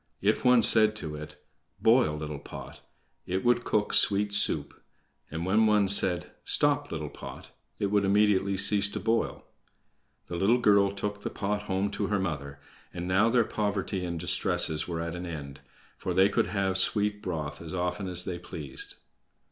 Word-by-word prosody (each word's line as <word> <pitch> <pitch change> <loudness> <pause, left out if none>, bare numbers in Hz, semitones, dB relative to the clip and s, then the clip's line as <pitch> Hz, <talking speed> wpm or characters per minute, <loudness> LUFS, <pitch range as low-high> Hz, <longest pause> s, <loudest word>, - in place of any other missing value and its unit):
If 105 +2 +1
one 125 -2 +5
said 110 0 +5
to 80 -8 -5
it, 75 0 -8 0.4
"Boil, 115 -9 +3
little 75 -1 -5
pot!" - - -10 0.5
it 95 +3 -2
would 120 0 +3
cook 105 -3 0
sweet 100 0 +3
soup; 75 -7 0 0.5
and 80 +2 -4
when 110 +4 +3
one 105 -2 +3
said: 90 -3 +2
"Stop, - - +1
little - - -4
pot!" - - -10 0.3
it 100 -1 -2
would 105 -1 +2
immediately 100 -1 +2
cease 100 +1 +3
to - - -5
boil. 115 +1 -1 0.8
The 85 - -6
little 105 +7 +3
girl 100 -4 +4
took 105 +1 -5
the - - -3
pot 105 +1 -2
home 95 +1 0
to 100 - -2
her 105 0 0
mother, 70 -7 -4 0.3
and 90 0 -6
now 95 +5 +3
their 120 0 +3
poverty 100 -3 -2
and 85 -1 -4
distresses 80 -2 0
were 85 -2 -3
at 85 0 -4
an 90 0 -6
end, 70 -5 -7 0.4
for - - -3
they 95 +2 +5
could - - +1
have 95 -2 0
sweet 105 +1 +1
broth 75 -5 -5
as 85 +2 -6
often 90 +2 -2
as 90 -1 +5
they 90 -2 -4
pleased. 75 -6 -6
95 Hz, 175 wpm, -28 LUFS, 85-105 Hz, 0.8 s, one